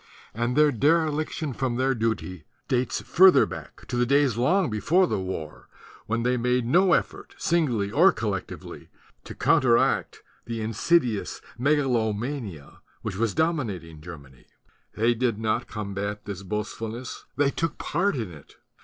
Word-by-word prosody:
And 120 +2 -1
their 150 -1 +5
dere 155 +6 +3
liction 155 -2 -3
from 130 -3 -1
their 130 +2 +1
duty 110 -7 -3 0.2
dates 130 -2 0
further 185 +1 +6
back, - - -10
to - - -5
the 120 0 +2
days 140 -3 +3
long 155 - +2
before 160 - +3
the 170 - -1
war 85 -5 -6 0.4
when 115 +1 -1
they 125 +1 +1
made 125 0 +1
no 175 +8 +4
effort, - - -2
singly 125 -12 0
or 175 - +6
collectively, 105 - -5 0.4
to - - -8
counteract 125 +1 +2 0.2
the 115 -1 -4
insidious 115 +1 0 0.2
megalomania 120 - -1 0.2
which 95 - -4
was 110 -3 0
dominat 145 - 0
ing 80 -2 -13
Germany. 70 -6 -12 0.5
They 115 +2 +3
did 120 -2 0
not 110 0 -1
combat 100 0 -5
this 100 -2 -6
boast 105 +2 -4
fulness; 115 +3 -6
they 145 -1 +2
took 165 0 -2
part 190 +4 0
in 110 -8 -4
it. 75 -4 -15
120 Hz, 150 wpm, -25 LUFS, 105-145 Hz, 0.5 s, further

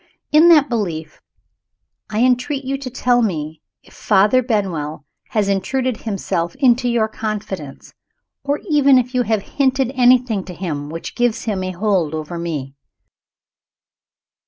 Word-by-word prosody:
In 315 +3 +6
that 300 -4 +6
belief, 170 - -4 0.9
I 215 +1 -1
entreat 255 +2 +1
you 270 +1 -1
to 275 -1 -6
tell 245 -1 +1
me 160 -7 -3 0.2
if - - -20
Father 210 +5 +3
Benwell 180 - -2 0.2
has 210 -3 0
intruded 230 +6 -1
himself 190 -4 -3
into 250 -2 +3
your 235 -2 +1
confidence 205 -9 -6 0.5
or 285 +1 -1
even 285 -4 +5
if 250 0 0
you 250 - +2
have 220 -4 0
hinted 265 -2 0
anything 245 -5 +3
to 180 - -9
him 150 -6 -4
which 165 +1 -7
gives 240 -2 0
him 200 -4 -2
a 185 - -3
hold 185 -4 0
over 155 +2 -5
me. 150 -6 -4
220 Hz, 140 wpm, -19 LUFS, 175-255 Hz, 0.9 s, In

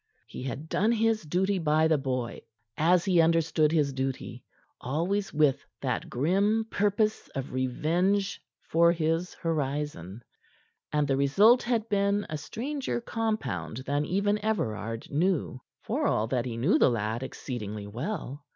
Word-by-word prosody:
He - - -9
had 135 +4 -5
done 210 +7 +2
his 225 -1 +2
duty 185 +5 0
by 155 -1 +3
the 160 -2 +2
boy 125 -3 -3 0.3
as 170 +4 +3
he 180 -3 +4
understood 160 -2 +3
his 150 -4 +2
duty, 135 0 -4 0.4
always 175 +9 -1
with 150 -3 +2 0.2
that - - -2
grim 200 - +1
purpose 210 +1 +1
of 135 -1 -4
revenge 175 +10 0 0.2
for 170 +1 +4
his 165 +1 -1
horizon. 145 - -3 0.7
And 150 -1 +1
the 135 -1 +1
result 200 - +5
had 235 -2 0
been 200 -1 +1
a 155 - -2
stranger 255 - -3
compound 130 - -3
than 145 +1 0
even 205 +4 0
Everard 115 - -2
knew, 155 -4 0 0.2
for - - 0
all 105 - +1
that 125 -2 0
he 120 -2 -4
knew 155 - +3
the - - +6
lad 115 0 -1
exceedingly 110 -6 -5
well. 140 - -5
155 Hz, 140 wpm, -28 LUFS, 130-200 Hz, 0.7 s, the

